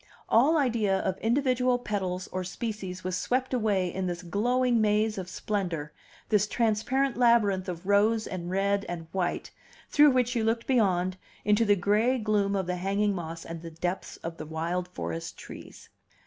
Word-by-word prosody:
All 285 +8 +5
idea 230 -8 +2
of 190 -1 -1
individual 250 +1 +2
petals 190 -6 -3
or 185 0 -2
species 190 -1 -5
was 185 0 -2
swept 255 +6 -1
away 200 -7 +1
in 190 -1 -2
this 175 0 -4
glowing 240 +6 +1
maze 215 0 +2
of 180 -1 -6
splendor, 175 -7 -3 0.4
this 210 -1 +3
transparent 235 +5 0
labyrinth 210 -6 +3
of 175 0 -6
rose 215 +3 +3
and 175 -2 -5
red 200 +2 +1
and 170 -2 -5
white, 185 -2 -2 0.4
through 295 0 +7
which 250 -1 +1
you 230 - +1
looked 225 +1 0
beyond, 185 -7 +1 0.3
into 210 +2 +3
the 205 -1 +5
gray 210 +7 +2
gloom 210 -3 +1
of 190 -1 0
the 180 0 -2
hanging 200 +3 0
moss 165 -2 -6
and 165 -1 -7
the 165 - -7
depths 175 +3 -4
of 165 0 -5
the 155 - -6
wild 170 +3 -2
forest 85 - -5
trees. - - -11
200 Hz, 170 wpm, -28 LUFS, 180-230 Hz, 0.4 s, through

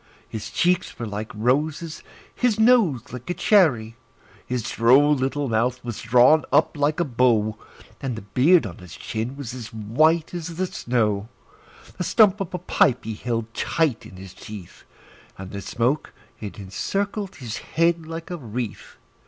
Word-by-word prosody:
His 110 - -6
cheeks 180 +1 0
were 120 - -4
like 105 +2 -5
roses, 150 +8 -1 0.3
his 235 -4 +1
nose 220 - +3
like 125 +3 -8
a 175 - -1
cherry; 120 - +3 0.5
His 125 -2 -2
droll 135 +8 +4
little 140 +1 -1
mouth 120 +2 0
was 120 -3 -5
drawn 125 +7 +5
up 150 +3 +3
like 150 +3 0
a 175 - +2
bow, 115 -5 +2 0.5
And 130 -3 -3
the 110 - -8
beard 135 - +4
on 90 -5 -8
his 90 -2 -11
chin 115 +5 -4
was 130 -4 -6
as 120 -3 -8
white 155 +11 +1
as 170 -1 -5
the 185 +3 0
snow; 110 - -1 0.7
The - - 0
stump 205 +1 +4
of 190 - -4
a - - -1
pipe 140 -7 +2
he 110 - -4
held 115 0 -3
tight 150 -2 0
in - - -14
his 95 0 -10
teeth, 100 -5 -11 0.5
And 95 0 -8
the 100 - -5
smoke, 125 +9 -1 0.3
it 105 -2 -7
encircled 195 - -3
his 120 -4 -6
head 165 0 0
like 165 +2 -7
a 175 - -3
wreath. 120 -5 -6
125 Hz, 165 wpm, -23 LUFS, 110-165 Hz, 0.7 s, drawn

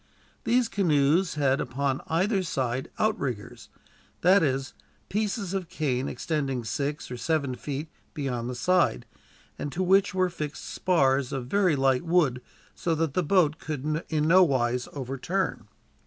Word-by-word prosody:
These 240 +1 +3
canoes 170 -3 +2
had 140 -1 +2
upon 135 +1 -1
either 190 +5 +1
side 130 -7 -2
outriggers 140 - -2 0.5
that 190 +2 +6
is, 135 -3 -1 0.4
pieces 205 -2 -2
of 185 -4 -3
cane 140 -7 -1
extending 135 -6 -2
six 140 +6 -3
or 125 - -4
seven 145 -2 0
feet 145 +4 -5 0.3
beyond 125 -5 -3
the 125 - -4
side, 170 - +2 0.5
and 145 - -3
to 185 +5 -1
which 190 +1 +3
were 185 -1 +2
fixed 150 -3 -5
spars 135 -7 +1
of 135 -3 -3
very 185 +3 +2
light 135 -2 +2
wood, 165 -8 +2 0.3
so 165 -2 -1
that 160 -3 -1
the 185 - +2
boat 160 -2 +2
could 155 +1 -3
in 155 -1 +1
no 185 +3 +7
wise 125 -5 +1
overturn. 135 +8 -3
150 Hz, 145 wpm, -27 LUFS, 135-180 Hz, 0.5 s, no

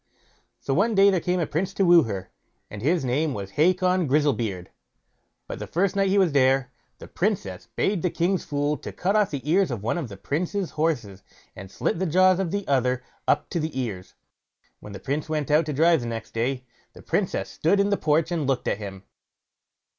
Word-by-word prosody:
So 135 - -2
one 210 +8 +2
day 200 +1 +6
there 185 - +1
came 180 +1 -1
a 170 - +1
prince 185 +6 -3
to 195 - +2
woo 175 -1 +7
her, 95 -4 -5 0.4
and 105 - -7
his 155 +3 +1
name 140 +3 0
was 100 -1 -6
Hacon 180 - +2
Grizzlebeard; 125 -10 0 0.8
but - - -7
the - - -6
first 190 +3 0
night 195 -1 +2
he 195 - +2
was 185 -4 +4
there, 135 -2 +2 0.3
the - - -11
Princess - - -2
bade 195 -4 0
the 180 - +1
king's 175 +2 0
fool 145 +1 -1
cut 190 +8 -2
off 210 -2 +3
the 140 -1 -6
ears 185 +2 +3
of 115 -6 -4
one 120 +10 -1
of 140 -8 -5
the 100 - -9
prince's 175 - -2
horses, 125 - -2 0.3
and 95 - -9
slit 165 - -2
the 190 - 0
jaws 185 +3 +4
of 190 -3 -1
the 200 +2 -3
other 130 -2 +1 0.2
up 145 - +2
to 170 - -1
the 155 -4 -3
ears. 100 -8 -5 0.6
When 105 - -10
the 100 - -7
prince 145 +9 -3
went 150 -3 -2
out 155 +1 +3
to 150 - -2
drive 160 -1 +3
next 115 -2 -6
day, 125 +3 -2 0.3
the - - -14
Princess - - -1
stood 195 +6 +1
in 200 +1 +2
the - - +4
porch 155 +2 +1
and 160 -5 -1
looked 135 -3 -1
at - - 0
him. 95 -2 -8
150 Hz, 205 wpm, -25 LUFS, 125-180 Hz, 0.8 s, woo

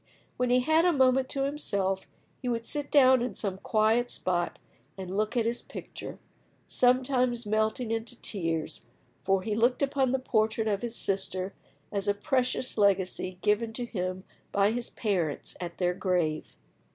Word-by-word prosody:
When 250 0 0
he 250 +1 +4
had 315 +5 +4
a 355 - +5
moment 260 -3 +3
to 275 - -1
himself, 200 -10 -1 0.3
he 250 - -2
would 230 -1 -1
sit 290 +2 -3
down 260 -3 +6
in 240 -5 -2
some 190 -3 -3
quiet 220 +4 +2
spot 175 -1 -1 0.4
and 190 0 -5
look 215 +4 0
at 230 - +2
his 235 +1 -1
picture, - - -8 0.5
sometimes 250 -1 +2
melting 220 +2 0
into 225 +2 -3
tears, 165 -6 -3 0.4
for 195 -1 +2
he 215 - -1
looked 240 +5 +2
upon 270 -2 +1
the 265 - +2
portrait 220 -3 +1
of 200 -2 0
his 240 -1 -4
sister 190 -1 -1 0.4
as 200 0 -2
a 205 - +2
precious 255 +1 0
legacy 190 -2 +1
given 220 +2 +1
to 245 +2 -3
him 185 -4 -3 0.3
by 200 +1 +3
his 240 +1 -2
parents 180 -9 -2
at 170 -1 -5
their 180 -1 +1
grave. 180 -5 -1
220 Hz, 165 wpm, -29 LUFS, 195-250 Hz, 0.5 s, down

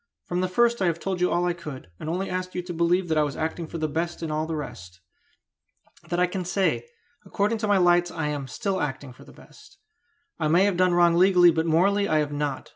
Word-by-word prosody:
"From 180 0 -2
the 185 - 0
first 235 +4 +2
I 185 - +2
have 165 -1 -1
told 190 -1 -3
you 180 - +3
all 175 +1 +1
I 175 - +1
could, 150 - -9
and 155 - -5
only 185 +4 -2
asked 185 0 -4
you 180 - -2
to 175 0 -6
believe 175 +2 +1
that 160 -1 +1
I - - +4
was 145 -2 -4
acting 160 +1 -3
for 170 - -6
the 155 -1 -1
best 170 +3 -3
in 160 - -3
all 155 +1 -1
the 165 - -3
rest. 90 - -8 1.1
That 175 - -1
I 180 - +4
can 180 +1 -4
say: 190 - 0 0.4
according 210 +2 -1
to 215 - -2
my 205 -1 +3
lights 175 -1 +3
I 160 -2 -4
am 145 -2 -4
still 190 +7 -2
acting 135 -2 -4
for - - -16
the - - -15
best. - - -18 0.6
I 155 - 0
may 170 +5 +4
have 200 -2 +2
done 180 0 +2
wrong 175 -1 +5
legally, 180 0 +6
but 160 0 -1
morally 200 +5 +2
I 155 - +2
have 150 -1 0
not. 145 -1 -3
175 Hz, 250 wpm, -25 LUFS, 155-185 Hz, 1.1 s, legally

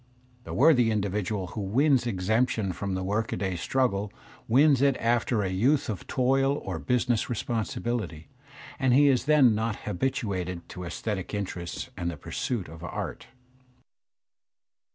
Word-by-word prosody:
The - - -6
worthy 130 -5 +5
individual 100 -1 -1
who 105 - -5
wins 125 +5 +2
y - - +1
exemption 110 0 0
from 95 +2 -3
the 95 - -2
workaday 100 -2 -1
struggle 105 0 0 0.4
wins 135 +2 +5
it 140 -1 +3
after 120 -1 +1
a 95 - -1
youth 120 +11 +2
of 105 -5 -5
toil 135 +2 +2
or - - -5
business 125 -2 0
responsibility, 110 -7 -3 0.5
and 130 -2 +3
he 145 +1 +6
is 130 -3 +2
then 145 -6 +5
not 110 0 -1
habituated 95 -5 -2
to 90 - -7
aesthetic 100 +2 -4
interests 100 +4 -5
and 85 -2 -2
the 85 - -6
pursuits 105 - -3
of 80 +2 -11
art. 85 - -5
110 Hz, 140 wpm, -27 LUFS, 95-125 Hz, 0.5 s, he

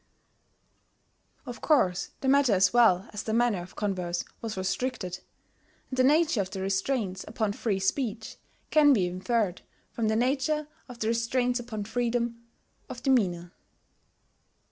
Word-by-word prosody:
] - - -42
Of 245 -2 -8
course 195 - +2
the 270 - -2
matter 270 -4 +4
as 190 +1 +3
well 225 -5 +4
as 210 - -4
the 220 - -2
manner 235 -6 +2
of 175 - -12
converse 180 -4 -2 0.2
was 220 -3 -5
restricted; 190 0 -2 0.7
and 260 - -4
the - - +6
nature 300 -3 +3
of 185 - -4
the 190 0 -6
restraints 195 +1 -1
upon 215 -1 -1
free 205 -2 -1
speech 220 +2 -2 0.3
can 295 -2 +6
be 195 -8 +2
inferred 185 +2 -1 0.3
from 225 -2 -1
the 220 - +1
nature 275 +5 0 0.2
of 245 - -9
the 220 -1 -1
restraints 245 +2 0
upon 225 -3 -5
freedom 235 +1 -1 0.5
of 245 - -8
demeanour. 180 -10 +1
225 Hz, 145 wpm, -28 LUFS, 190-250 Hz, 0.7 s, the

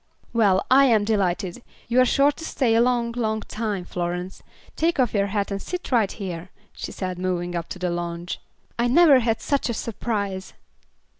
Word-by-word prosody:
"Well, 200 -5 +3
I 275 +2 +7
am 225 -5 +4
delighted. 195 -1 0 0.3
You 245 +2 +4
are - - +5
sure 280 +4 +4
to 310 - -11
stay 255 -7 +1
a 225 - +5
long, 240 -1 +1
long 220 -2 -1
time, 210 -5 -3
Florence. 180 +1 -4 0.3
Take 330 -1 +1
off 245 -3 +2
your 200 -1 +2
hat 200 0 -2
and 200 0 -3
sit 360 -4 -5
right 225 -6 +3
here," 180 -3 -6 0.2
she - - -6
said, 185 -2 -4
moving 175 -1 -2
up 170 -1 -3
on - - -4
the 180 -1 -1
lounge. 175 0 -4 0.4
"I 240 - +3
never 285 +1 +6
had 225 -2 0
such 280 -3 0
a 235 - -1
surprise." 200 -4 -3
215 Hz, 190 wpm, -24 LUFS, 185-240 Hz, 0.4 s, I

